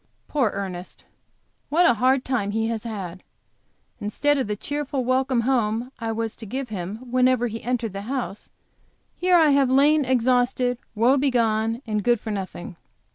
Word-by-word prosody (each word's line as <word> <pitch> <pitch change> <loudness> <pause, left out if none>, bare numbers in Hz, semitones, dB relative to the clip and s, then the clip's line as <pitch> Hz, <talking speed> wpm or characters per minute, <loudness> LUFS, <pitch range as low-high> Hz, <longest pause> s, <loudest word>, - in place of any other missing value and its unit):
Poor 270 -7 +1
Ernest! 190 -3 -6 0.6
What 340 +4 +4
a - - +6
hard 255 +3 +2
time 240 -6 -1
he 225 +2 -1
has 230 -1 -4
had! 190 -5 -6 0.8
Instead 280 +8 +1
of 260 - -1
the 210 - -2
cheerful 285 +2 -3
welcome 255 -1 +2
home 235 -1 0
I 225 -1 -2
was 225 0 -3
to 225 - -9
give 260 +3 -4
him 215 +5 -6
whenever 255 -1 +3
he 225 -1 -4
entered 240 -4 -2
the 195 - -5
house, 255 -6 -4 0.7
here 365 0 +3
I 315 -3 +5
have 275 -2 +3
lain 290 +3 +4
exhausted, 250 -1 +1 0.2
woe 240 +6 +4
begone 230 -3 +1
and 210 -2 -1
good 240 0 +3
for 220 - -5
nothing. 185 -3 -6
240 Hz, 165 wpm, -24 LUFS, 215-260 Hz, 0.8 s, a